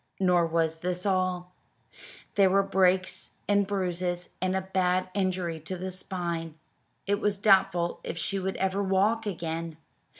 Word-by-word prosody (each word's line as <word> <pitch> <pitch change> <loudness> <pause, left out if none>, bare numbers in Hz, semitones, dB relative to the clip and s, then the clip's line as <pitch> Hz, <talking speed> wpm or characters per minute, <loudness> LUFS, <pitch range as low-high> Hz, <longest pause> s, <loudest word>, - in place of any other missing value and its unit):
Nor 180 -3 +3
was 160 -1 0
this 180 +2 -3
all. 185 -2 0 0.8
There 195 -2 +5
were 195 +1 +4
breaks 190 -1 +1
and 205 -1 +3
bruises, 180 -2 -2
and 185 0 +1
a 190 - +1
bad 185 -1 0
injury 185 -4 -1
to 175 +4 -5
the 185 +1 -4
spine. 170 -4 -4 0.5
It 205 +1 +1
was 205 -1 +1
doubtful 195 -4 +3
if 170 - -5
she 195 +3 -1
would 190 0 -2
ever 190 +1 0
walk 200 +3 +2
again. 165 -3 -4
185 Hz, 145 wpm, -28 LUFS, 175-195 Hz, 0.8 s, There